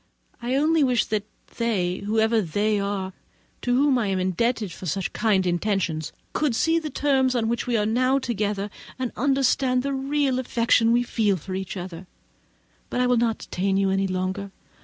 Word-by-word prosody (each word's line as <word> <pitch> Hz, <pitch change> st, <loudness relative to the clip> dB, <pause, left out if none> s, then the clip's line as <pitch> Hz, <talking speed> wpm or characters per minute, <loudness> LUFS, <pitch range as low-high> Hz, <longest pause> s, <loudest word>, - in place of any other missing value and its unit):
I 245 Hz, +2 st, -1 dB
only 310 Hz, +2 st, +3 dB
wish 250 Hz, -4 st, +2 dB
that 210 Hz, -1 st, -2 dB, 0.3 s
they, 190 Hz, -7 st, 0 dB
whoever 220 Hz, +2 st, +1 dB
they 205 Hz, +4 st, 0 dB
are, 200 Hz, -1 st, -3 dB, 0.5 s
to 245 Hz, 0 st, +1 dB
whom 270 Hz, -1 st, +3 dB
I 220 Hz, -, 0 dB
am 195 Hz, -1 st, 0 dB
indebted 210 Hz, +3 st, 0 dB
for 180 Hz, -, -8 dB
such 190 Hz, +4 st, -2 dB
kind 200 Hz, -5 st, +2 dB
intentions, 175 Hz, -3 st, -1 dB, 0.2 s
could 295 Hz, -6 st, +1 dB
see 325 Hz, +6 st, +2 dB
the 310 Hz, -2 st, -5 dB
terms 265 Hz, -3 st, +1 dB
on 225 Hz, -2 st, +1 dB
which 235 Hz, +2 st, -1 dB
we 240 Hz, -2 st, +2 dB
now 255 Hz, +4 st, +2 dB
are -, -, +1 dB
together, 210 Hz, -4 st, -2 dB, 0.3 s
and 255 Hz, -2 st, -2 dB
understand 265 Hz, -1 st, +2 dB
the 280 Hz, 0 st, -1 dB
real 270 Hz, -1 st, 0 dB
affection 235 Hz, -2 st, +2 dB
we 240 Hz, +1 st, +3 dB
feel 215 Hz, -5 st, +1 dB
for 185 Hz, +3 st, -7 dB
each 190 Hz, +1 st, -4 dB
other; 180 Hz, 0 st, -7 dB, 0.8 s
but -, -, -2 dB
I 250 Hz, -, +3 dB
will 250 Hz, -1 st, +3 dB
not 230 Hz, -1 st, +1 dB
detain 195 Hz, +1 st, -1 dB
you 195 Hz, -1 st, +2 dB
any 195 Hz, 0 st, +1 dB
longer. 185 Hz, +2 st, -2 dB
225 Hz, 180 wpm, -24 LUFS, 195-255 Hz, 0.8 s, only